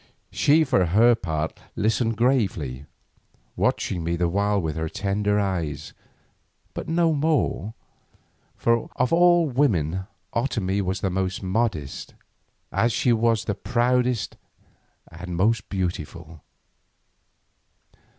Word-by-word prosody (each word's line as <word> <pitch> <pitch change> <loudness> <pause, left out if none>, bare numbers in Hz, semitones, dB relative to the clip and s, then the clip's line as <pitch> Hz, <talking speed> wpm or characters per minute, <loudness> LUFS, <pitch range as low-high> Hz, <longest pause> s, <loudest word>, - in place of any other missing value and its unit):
She 155 +3 +4
for 130 -10 +2
her 110 +8 +5
part 80 -8 -3 0.2
listened 115 +1 0
gravely, 95 - 0 0.7
watching 85 -3 0
me 85 +1 -1
the 85 0 +1
while 100 +3 +1
with 80 -4 -2
her 80 0 -2
tender 105 +1 0
eyes, 80 -7 -3 0.8
but - - -6
no 165 0 +2
more, 145 -8 0 0.8
for 115 0 +1
of 125 +4 +1
all 175 0 +5
women 95 - 0 0.3
Otomie 105 -6 0
was 95 0 -2
the 95 - 0
most 95 +1 -2
modest, 95 - -2 0.6
as 120 - +2
she 120 +2 +2
was 115 -1 +1
the 100 - -1
proudest 125 0 0 0.7
and 90 +1 -7
most 105 +4 +1
beautiful. 85 -4 -4
100 Hz, 110 wpm, -24 LUFS, 90-120 Hz, 0.8 s, her